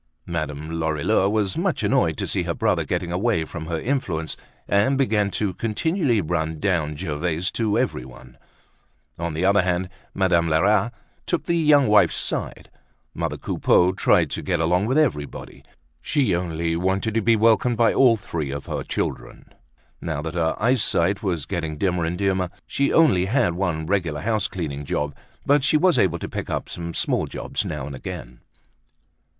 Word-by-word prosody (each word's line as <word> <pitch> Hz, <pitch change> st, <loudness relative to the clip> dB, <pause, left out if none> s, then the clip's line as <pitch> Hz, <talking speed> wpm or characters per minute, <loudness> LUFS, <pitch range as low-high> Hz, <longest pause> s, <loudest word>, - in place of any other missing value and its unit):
Madame 80 Hz, -2 st, -4 dB
Lorilleux 80 Hz, +4 st, +1 dB
was 105 Hz, -3 st, 0 dB
much -, -, -1 dB
annoyed -, -, +2 dB
to -, -, -1 dB
see -, -, 0 dB
her -, -, -2 dB
brother -, -, +1 dB
getting 85 Hz, -, -2 dB
away 95 Hz, -2 st, 0 dB
from 80 Hz, 0 st, -7 dB
her 80 Hz, -1 st, -2 dB
influence 85 Hz, -, -2 dB, 0.3 s
and 105 Hz, +7 st, +2 dB
begin 110 Hz, -7 st, +2 dB
to 100 Hz, +1 st, -2 dB
continually 120 Hz, -, 0 dB
run 80 Hz, -2 st, -2 dB
down 85 Hz, -6 st, 0 dB
Gervaise 80 Hz, +5 st, -2 dB
to 110 Hz, -3 st, 0 dB
everyone. 65 Hz, 0 st, -4 dB, 0.8 s
On 85 Hz, -2 st, -3 dB
the 85 Hz, +4 st, 0 dB
other 100 Hz, +1 st, +4 dB
hand, 90 Hz, 0 st, -1 dB, 0.3 s
Madame 85 Hz, -4 st, +2 dB
Lerat 100 Hz, +7 st, +3 dB, 0.4 s
took 170 Hz, -5 st, 0 dB
the 170 Hz, -, -1 dB
young 150 Hz, -5 st, +4 dB
wife's 105 Hz, 0 st, +4 dB
side. -, -, -3 dB, 0.4 s
Mother -, -, -3 dB
Coupeau 90 Hz, +1 st, +2 dB
tried 95 Hz, -, +2 dB
to -, -, -3 dB
get 90 Hz, -3 st, -1 dB
along 90 Hz, +5 st, +2 dB
with 130 Hz, +4 st, +1 dB
everybody. 95 Hz, -, -2 dB, 0.4 s
She 135 Hz, -, +1 dB
only 85 Hz, -1 st, -2 dB
wanted 95 Hz, +5 st, 0 dB
to 115 Hz, -, +1 dB
be 115 Hz, +2 st, +4 dB
welcomed 115 Hz, +2 st, +3 dB
by 115 Hz, 0 st, +4 dB
all 120 Hz, -4 st, +5 dB
three 85 Hz, -8 st, -4 dB
of 70 Hz, +1 st, -5 dB
her -, -, -3 dB
children. -, -, -5 dB, 0.5 s
Now 75 Hz, -3 st, -3 dB
that 80 Hz, -1 st, -4 dB
her 80 Hz, -2 st, 0 dB
eyesight 105 Hz, -5 st, +2 dB
was 85 Hz, -8 st, -2 dB
getting 80 Hz, -3 st, -3 dB
dimmer 90 Hz, -1 st, 0 dB
and 85 Hz, +2 st, -2 dB
dimmer 95 Hz, -2 st, 0 dB, 0.2 s
she 140 Hz, -, 0 dB
only 125 Hz, -, +4 dB
had 110 Hz, -4 st, +1 dB
one 85 Hz, -3 st, -2 dB
regular 85 Hz, -5 st, -1 dB
house 110 Hz, +1 st, 0 dB
cleaning 75 Hz, -6 st, -5 dB
job 75 Hz, 0 st, -2 dB, 0.3 s
but 145 Hz, 0 st, +3 dB
she 155 Hz, -, +4 dB
was 180 Hz, +2 st, +3 dB
able 85 Hz, -2 st, +2 dB
to -, -, -6 dB
pick -, -, -5 dB
up -, -, -3 dB
some 85 Hz, -1 st, -6 dB
small -, -, 0 dB
jobs -, -, -3 dB
now 65 Hz, -, -4 dB
and 70 Hz, -1 st, -7 dB
again. 60 Hz, -1 st, -8 dB
90 Hz, 170 wpm, -23 LUFS, 80-110 Hz, 0.8 s, all